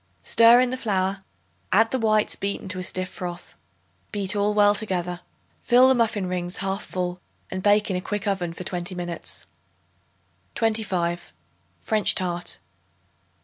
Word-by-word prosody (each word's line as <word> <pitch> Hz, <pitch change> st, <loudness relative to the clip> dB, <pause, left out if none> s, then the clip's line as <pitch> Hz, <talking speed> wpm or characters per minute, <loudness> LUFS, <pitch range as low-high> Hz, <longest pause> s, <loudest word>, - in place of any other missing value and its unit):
Stir 230 Hz, +1 st, +6 dB
in 250 Hz, 0 st, +2 dB
the 255 Hz, -, -2 dB
flour; 195 Hz, -4 st, -1 dB, 0.5 s
add 225 Hz, +3 st, +4 dB
the 260 Hz, -, 0 dB
whites 215 Hz, -2 st, +2 dB
beaten 200 Hz, 0 st, -4 dB
to 185 Hz, -1 st, -2 dB
a -, -, -4 dB
stiff 185 Hz, 0 st, -3 dB
froth. 175 Hz, -1 st, -7 dB, 0.6 s
Beat 200 Hz, -2 st, 0 dB
all 205 Hz, +1 st, +1 dB
well 205 Hz, -1 st, +5 dB
together. 180 Hz, -4 st, -3 dB, 0.4 s
Fill 250 Hz, +2 st, +5 dB
the 265 Hz, -, +5 dB
muffin 225 Hz, -5 st, 0 dB
rings 180 Hz, 0 st, -2 dB
1/2 195 Hz, 0 st, -2 dB
full 180 Hz, -1 st, -4 dB, 0.3 s
and 185 Hz, -, -3 dB
bake 205 Hz, +1 st, +3 dB
in -, -, -1 dB
a 180 Hz, -, -2 dB
quick 205 Hz, +1 st, -4 dB
oven 190 Hz, -4 st, -1 dB
for 170 Hz, -, -8 dB
twenty 180 Hz, 0 st, -3 dB
minutes. 175 Hz, -1 st, -5 dB, 1.1 s
25. 185 Hz, -, -1 dB, 0.5 s
French 215 Hz, -2 st, +3 dB
Tart. 175 Hz, -, -1 dB
195 Hz, 150 wpm, -24 LUFS, 180-215 Hz, 1.1 s, Stir